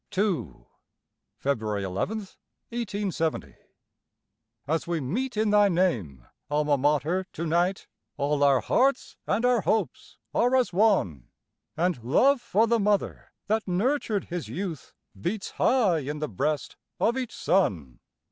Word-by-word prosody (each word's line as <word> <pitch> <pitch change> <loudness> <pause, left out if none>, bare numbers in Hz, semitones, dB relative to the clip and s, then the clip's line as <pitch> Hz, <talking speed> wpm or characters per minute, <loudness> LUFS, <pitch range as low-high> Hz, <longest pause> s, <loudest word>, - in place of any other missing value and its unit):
II. 190 - -1 0.8
(Feb. 110 -7 -1
11, 95 - -4 0.8
1870.) 200 - -2 1.1
As 160 +3 -1
we 170 -1 -1
meet 225 - -3
in 215 -1 +2
thy 205 -1 +5
name, 115 - 0 0.2
Alma 150 0 +2
Mater, 150 +6 +1
to 165 - -4
night, 175 +4 +1 0.3
All 145 0 +1
our 140 -2 +4
hearts 265 +1 +1
and 230 +4 +1
our 245 -3 +3
hopes 205 - -2 0.2
are 245 +2 +3
as 245 -9 +2
one, 175 - +2 0.5
And 170 -7 0
love 255 - +3
for 215 +1 +2
the 230 0 +2
mother 205 -1 0
that 220 +1 0
nurtured 210 +2 0
his 175 -2 -5
youth 175 -6 -6 0.2
Beats 195 - -3
high 215 -10 +2
in 145 +1 -4
the 150 0 -3
breast 145 +8 -2 0.2
of 235 - +2
each 255 -3 -4
son. 85 - 0
180 Hz, 130 wpm, -26 LUFS, 145-215 Hz, 1.1 s, thy